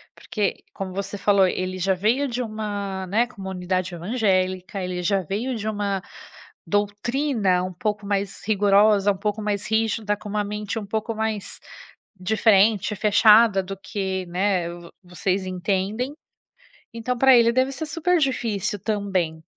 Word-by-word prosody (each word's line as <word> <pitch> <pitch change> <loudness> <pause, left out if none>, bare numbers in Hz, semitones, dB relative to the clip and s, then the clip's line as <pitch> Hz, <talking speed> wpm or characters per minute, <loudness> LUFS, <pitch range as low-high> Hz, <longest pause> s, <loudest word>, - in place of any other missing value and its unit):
Porque, 205 -3 -3
como 190 -1 -5
você 200 +1 -4
falou, 200 -1 +4
ele 185 0 -2
já 190 +1 +1
veio 225 +10 +1
de 250 -1 -3
uma, 205 -4 -4
né, 225 +6 +2
comunidade 185 -4 -3
evangélica, 185 -1 -1
ele 180 -1 -3
já 195 +2 +2
veio 215 +9 -3
de 215 -1 -4
uma 200 -2 -2 0.7
doutrina 205 -1 0
um 185 - -4
pouco 210 +3 -3
mais 200 -1 -2
rigorosa, 205 0 +4
um - - -10
pouco 210 +2 -2
mais 205 -1 -2
rígida, 220 -1 0
com 210 - -10
uma 210 0 -1
mente 210 +1 -4
um 215 - -4
pouco 220 +2 -3
mais 220 -2 -3 0.6
diferente, 210 +1 +3
fechada 210 0 +5
do 195 +1 -6
que, 190 -1 -4
né, 180 -1 0
vo 175 -1 -11
vocês 185 +2 -2
entendem, 195 +7 -2 0.8
então 240 +2 -3
pra 265 0 +7
ele 235 -1 +5
deve 260 +2 +1
ser 275 +4 -4
super 330 +3 +1
difícil 220 - -1
também. 190 -6 -2
205 Hz, 145 wpm, -23 LUFS, 190-220 Hz, 0.8 s, pra